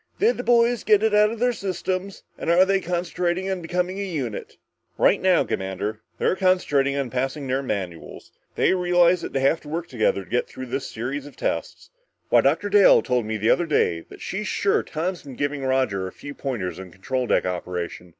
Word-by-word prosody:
Did 460 Hz, +4 st, +2 dB
the -, -, -4 dB
boys 240 Hz, 0 st, +3 dB
get 210 Hz, -1 st, +4 dB
it 220 Hz, -1 st, +2 dB
out 210 Hz, 0 st, +5 dB
of 230 Hz, -, -5 dB
their 245 Hz, +2 st, +2 dB
systems 190 Hz, -1 st, -4 dB
and -, -, -4 dB
are 175 Hz, +2 st, +6 dB
they 195 Hz, 0 st, +1 dB
concentrating 180 Hz, +1 st, -1 dB
on 185 Hz, -2 st, -3 dB
becoming 180 Hz, +3 st, -2 dB
a -, -, -2 dB
unit?" 140 Hz, -, -5 dB, 0.4 s
"Right -, -, +3 dB
now, -, -, +4 dB
Commander, 100 Hz, +3 st, -3 dB, 0.2 s
they're -, -, +1 dB
concentrating 145 Hz, -8 st, +2 dB
on 135 Hz, -4 st, -2 dB
passing 135 Hz, +3 st, -2 dB
their 130 Hz, +1 st, 0 dB
manuals. 95 Hz, -10 st, -5 dB, 0.2 s
They -, -, +3 dB
realize 175 Hz, -1 st, +3 dB
that -, -, -5 dB
they 135 Hz, -, -1 dB
have 140 Hz, +4 st, +2 dB
to 150 Hz, -, -11 dB
work 165 Hz, +2 st, -3 dB
together 110 Hz, -5 st, 0 dB
to 90 Hz, -, -20 dB
get 125 Hz, -, +1 dB
through 130 Hz, -, -8 dB
this 130 Hz, +2 st, -4 dB
series 135 Hz, +5 st, -4 dB
of 145 Hz, -, -13 dB
tests. -, -, -3 dB, 0.4 s
Why, -, -, +6 dB
Dr. 205 Hz, -, +1 dB
Dale 205 Hz, -1 st, +6 dB
told 125 Hz, -4 st, 0 dB
me 110 Hz, 0 st, -2 dB
the 110 Hz, +2 st, +2 dB
other 175 Hz, -1 st, +2 dB
day 85 Hz, -, +2 dB
that -, -, -13 dB
she's 210 Hz, +3 st, -4 dB
sure 200 Hz, -, +1 dB
Tom's 175 Hz, +3 st, -3 dB
been 135 Hz, -3 st, -10 dB
giving 145 Hz, 0 st, -2 dB
Roger 130 Hz, -8 st, 0 dB
a -, -, -7 dB
few 145 Hz, -, -9 dB
pointers 115 Hz, -12 st, -4 dB
on 95 Hz, -1 st, -9 dB
control 125 Hz, +8 st, -3 dB
deck -, -, +2 dB
operation. 90 Hz, -1 st, -4 dB
145 Hz, 210 wpm, -24 LUFS, 120-185 Hz, 0.4 s, are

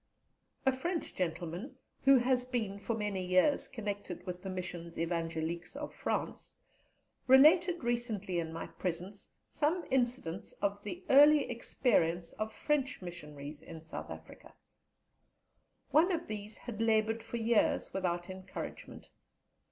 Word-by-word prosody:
A 265 Hz, -, +6 dB
French 330 Hz, +6 st, -3 dB
gentleman, 175 Hz, -, -3 dB, 0.3 s
who 270 Hz, 0 st, +8 dB
has 250 Hz, 0 st, +2 dB
been 225 Hz, -6 st, -2 dB
for 230 Hz, +3 st, -2 dB
many 205 Hz, -3 st, -2 dB
years 185 Hz, +10 st, +3 dB
connected 205 Hz, -7 st, -5 dB
with 180 Hz, -1 st, -5 dB
the 190 Hz, -, -5 dB
Missions 175 Hz, -2 st, -5 dB
Evangéliques 165 Hz, +2 st, -2 dB
of 295 Hz, +1 st, -5 dB
France, -, -, -3 dB, 0.7 s
related 335 Hz, +6 st, +6 dB
recently 225 Hz, -7 st, -1 dB
in 160 Hz, -1 st, -3 dB
my 165 Hz, -, -5 dB
presence 185 Hz, +3 st, -5 dB, 0.2 s
some 325 Hz, +4 st, 0 dB
incidents 240 Hz, -7 st, 0 dB
of 200 Hz, 0 st, -2 dB
the 350 Hz, -, -6 dB
early 290 Hz, +1 st, +8 dB
experience 175 Hz, -8 st, +1 dB
of 215 Hz, 0 st, -2 dB
French 290 Hz, -1 st, 0 dB
Missionaries 150 Hz, -4 st, -8 dB
in 160 Hz, 0 st, -9 dB
South 160 Hz, -, -7 dB
Africa. -, -, -11 dB, 1.4 s
One 335 Hz, +5 st, +5 dB
of 340 Hz, -1 st, -1 dB
these 210 Hz, 0 st, -5 dB
had 230 Hz, -3 st, -6 dB
laboured 225 Hz, 0 st, +2 dB
for 230 Hz, +1 st, -5 dB
years 230 Hz, -1 st, +2 dB
without 175 Hz, -2 st, -1 dB
encouragement. 185 Hz, 0 st, -8 dB
210 Hz, 130 wpm, -33 LUFS, 175-255 Hz, 1.4 s, who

